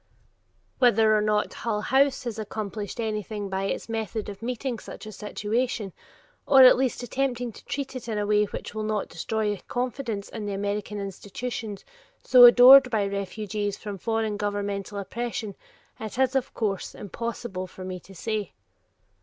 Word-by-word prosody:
Whether 225 -3 +5
or 210 - +3
not 210 0 +1
Hull 215 -2 -2
House 270 +4 +2
has 235 -3 -4
accomplished 210 0 -5
anything 215 -2 -3
by 190 0 -2
its 195 - -3
method 220 -1 -3
of 200 +1 -9
meeting 245 0 -3
such - - -10
a 215 - -7
situation, 210 0 -2 0.5
or 270 -2 +8
at 255 - +9
least 255 -1 -1
attempting 245 -1 -1
to - - -14
treat 275 -2 -4
it 250 -2 -6
in 220 -2 -2
a 205 - 0
way 210 0 +3
which 205 - -7
will 215 - -3
not 215 -1 -2
destroy 210 +3 -2
confidence 245 -4 -3
in 215 -2 -6
the 200 - -2
American 205 +1 -3
institutions 205 +2 -6 0.4
so 250 -2 +9
adored 250 +2 +9
by 215 -4 +1
refugees 200 +1 -3
from 205 -3 -7
foreign 225 0 -1
governmental 205 -1 -3
oppression, 220 +1 -4 0.5
it 220 +1 -6
is 265 0 +2
of 265 - 0
course 200 -4 -2
impossible 205 -2 -5
for 185 +1 -10
me 185 -1 -5
to 195 +2 -16
say. 215 +1 -3
215 Hz, 160 wpm, -26 LUFS, 205-240 Hz, 0.5 s, at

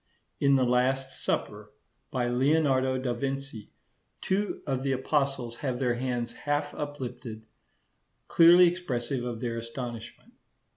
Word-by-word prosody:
In 140 -1 +4
the 130 - +3
'Last 130 +2 0
Supper,' 105 0 -2 0.4
by 125 -2 -1
Leonardo 130 0 +2
da 130 -1 -1
Vinci, 135 -3 -4 0.5
two 200 +2 -1
of 135 -3 -1
the 135 0 0
Apostles 130 -3 -1
have 130 -4 -2
their 125 -2 +1
hands 120 -1 -2
half 145 +2 -2
uplifted, 130 -6 -6 0.8
clearly 175 +2 +7
expressive 135 -8 -2
of 120 -2 -4
their 115 -2 -2
astonishment. 115 0 -7
130 Hz, 125 wpm, -28 LUFS, 120-140 Hz, 0.8 s, clearly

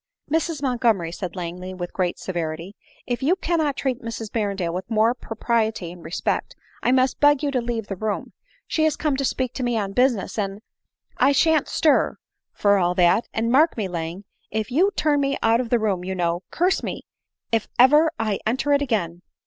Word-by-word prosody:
" - - -31
Mrs 325 -2 -1
Montgomery," 230 -10 +1
said 175 0 -6
Langley 180 +1 -5
with 175 -1 -6
great 180 -2 -1
severity, 170 0 -4 0.2
# - - -30
if 245 +1 -2
you 310 +7 +3
cannot 320 -6 0
treat 260 -3 -1
Mrs 225 -2 -6
Berrendale 200 -6 -1
with 185 +3 -5
more 225 +1 +3
propri 230 -1 0
ety 190 -6 -6
and 175 -1 -12
respect, 160 +3 -2 0.3
I - - +2
must 260 0 +2
beg 290 -1 +4
you 285 - +1
to 255 -3 0
leave 235 -2 -3
the 195 - -5
room; 210 +2 -3 0.3
she 315 - 0
is 315 - +2
come 300 -3 0
to 275 - -1
speak 255 -2 -1
to 260 - -4
me 240 -2 0
on 200 -2 -2
business, 245 -3 +1
and 200 +1 -3
— - - -60
" - - -68
" - - -36
I 280 - +4
shan't 315 0 +3
stir, 305 -3 +2 0.3
for 200 -1 +3
all 180 0 +1
that; 180 +5 +3
and 230 +1 -1
mark 305 +4 +4
me 210 -3 -1
Lang, 170 +2 -5 0.3
if 220 +3 -3
you 350 +10 +4
turn 295 -2 +2
me 275 0 0
out 230 +2 +4
of 240 - -6
the 240 - +3
room, 200 -5 -1
you 190 +1 -3
know, 175 -1 0
curse 360 +3 +1
me, - - -5 0.5
if 225 -2 +1
ever 295 +6 +6
I 215 -3 -1
enter 265 +5 +1
it 285 - +3
again 180 -10 -1
225 Hz, 215 wpm, -23 LUFS, 185-270 Hz, 0.5 s, ever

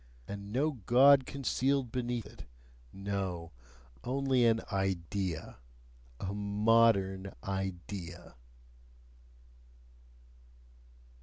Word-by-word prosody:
And 100 0 -7
no 140 +7 +1 0.2
God 135 +2 +6
concealed 135 -2 0
beneath 120 -3 -2
it - - -12 0.5
no! 95 -4 -4 0.5
only 130 -1 +2
an 115 0 +3
"idea," 95 -2 -2 0.6
a 95 +1 -3
"modern 100 -2 +2
idea"! 95 -2 -5
100 Hz, 70 wpm, -32 LUFS, 95-125 Hz, 0.6 s, God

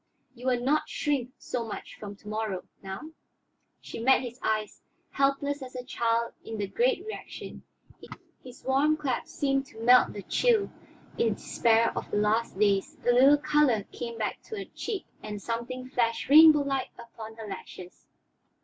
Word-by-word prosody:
You 250 +1 -8
will 250 -1 +2
not 285 +5 +1
shrink 275 -5 -1
so 245 - -4
much 225 - -7
from 205 -1 -7
to 205 - -18
morrow, 215 -3 -3 0.2
now?" 195 +11 -7 0.7
She - - -8
met 260 +3 +4
his 245 0 -7
eyes, 215 -1 -1 0.3
helpless 280 +1 0
as 255 -1 -9
a 250 - -5
child 235 -2 0
in 225 - -6
the 205 - -1
great 470 - +1
reaction; 435 - -8 0.8
his 250 -1 -13
warm 285 +4 +2
clasp 275 -5 -2
seemed 275 -1 -1
to 220 - -14
melt 245 +2 +5
the 205 - -7
chill 455 -5 +2 0.5
despair 225 +1 +2
of - - -4
the - - -1
last 210 0 +1
days, 205 +9 +1
a - - +7
little 270 +4 +6
color 285 -8 +2
came 235 -1 -6
back 215 -2 -3
to 440 - -7
her 395 - -5
cheek 410 -4 -4 0.2
and 210 -1 -6
something 235 +4 -4
flashed 230 -3 -1
rainbow 305 0 +9
like 275 -1 -2
upon 225 -2 -10
her 225 -1 -8
lashes. 185 -2 -10
245 Hz, 165 wpm, -28 LUFS, 220-275 Hz, 0.8 s, rainbow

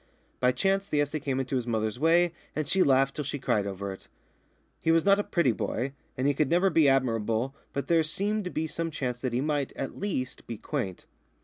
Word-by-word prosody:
By 125 0 +4
chance 195 +9 +1
the 150 - 0
essay 145 +1 0
came 135 -2 -1
into 130 0 -2
his 125 -2 -1
mother's 110 0 -1
way, 170 +2 +4 0.2
and 155 -2 -1
she 190 - +2
laughed 135 -2 +4
till 150 - -2
she 145 +1 -3
cried 105 -6 0
over 100 0 -4
it. 95 - -14 0.7
He - - 0
was 165 +1 +4
not 200 0 +5
a - - +1
pretty 170 -10 +2
boy, 125 +4 -2 0.2
and 130 - -1
he 145 - +4
could 145 0 +1
never 180 +3 +3
be 155 -4 +5
admirable, 115 -1 +1 0.2
but 140 - -3
there 165 -1 +4
seemed 200 +6 -1
to - - -2
be 160 -2 -2
some 165 +1 -3
chance 125 -6 -3
that 130 - -1
he 120 +2 0
might, 145 -2 -1
at 135 - -5
least, 130 -11 -3
be 115 - -5
quaint. 105 - -4
140 Hz, 225 wpm, -28 LUFS, 125-165 Hz, 0.7 s, not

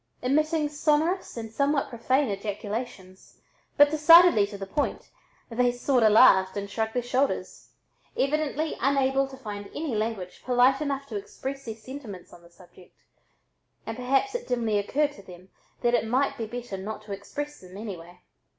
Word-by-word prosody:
Emitting 305 +4 +1
sonorous 305 +3 0
and 225 -1 -6
somewhat 280 +4 0
profane 260 +3 +1
ejaculations, 200 -1 -6 0.4
but 290 0 +7
decidedly 310 - +7
to 205 - -8
the 195 - -6
point, 285 +9 -3 0.4
they 245 +1 +2
"sort'a" 245 -2 +2
laughed 190 -4 +5
and 200 0 -5
shrugged 220 +2 -2
their 245 - 0
shoulders, 260 +3 -2 0.5
evidently 305 +2 0
unable 270 0 +2
to 265 0 -11
find 205 -5 -7
any 300 -4 -3
language 210 -4 -4
polite 255 +2 +3
enough 280 -2 -2
to 225 -7 -5
express 270 +7 -7
their 225 -2 -5
sentiments 225 -5 -10
on 175 - -14
the 170 - -18
subject 180 0 -19 0.9
and 225 - -5
perhaps 270 - 0
it 485 0 -4
dimly 230 -4 0
occurred 290 +8 0
to 205 - -14
them 185 -1 -14 0.3
that 240 -1 +2
it 230 -2 +1
might 260 +5 +1
be 225 - -5
better 240 -3 -6
not 210 +2 -6
to 210 - -11
express 290 +9 -6
them 185 +1 -12
anyway. 180 -4 -9
245 Hz, 160 wpm, -26 LUFS, 205-280 Hz, 0.9 s, but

